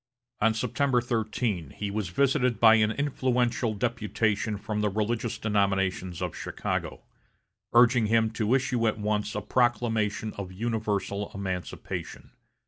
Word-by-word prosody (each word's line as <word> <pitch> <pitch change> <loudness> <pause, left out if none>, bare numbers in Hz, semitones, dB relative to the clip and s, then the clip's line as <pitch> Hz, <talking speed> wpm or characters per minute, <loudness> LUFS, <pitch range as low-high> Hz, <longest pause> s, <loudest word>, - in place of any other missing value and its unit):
On 110 +1 +3
September 125 +3 +1
13, 110 - -2
he 105 -1 -3
was 105 -3 -2
visited 125 - +2
by 110 -1 +8
an 110 -1 +4
influential 125 -3 0
deputation 110 -1 -1
from 105 +1 -3
the 105 - +2
religious 110 +3 -1
denominations 95 -4 0
of 90 - -3
Chicago, - - -4 0.7
urging 120 -1 +5
him 110 0 +3
to 110 +2 +1
issue 125 -3 +1
at 110 - 0
once 105 +1 -1
a - - -1
proclamation 115 -3 0
of 95 -2 -5
universal 105 -1 -2
emancipation. 95 -2 -5
110 Hz, 130 wpm, -27 LUFS, 105-120 Hz, 0.7 s, by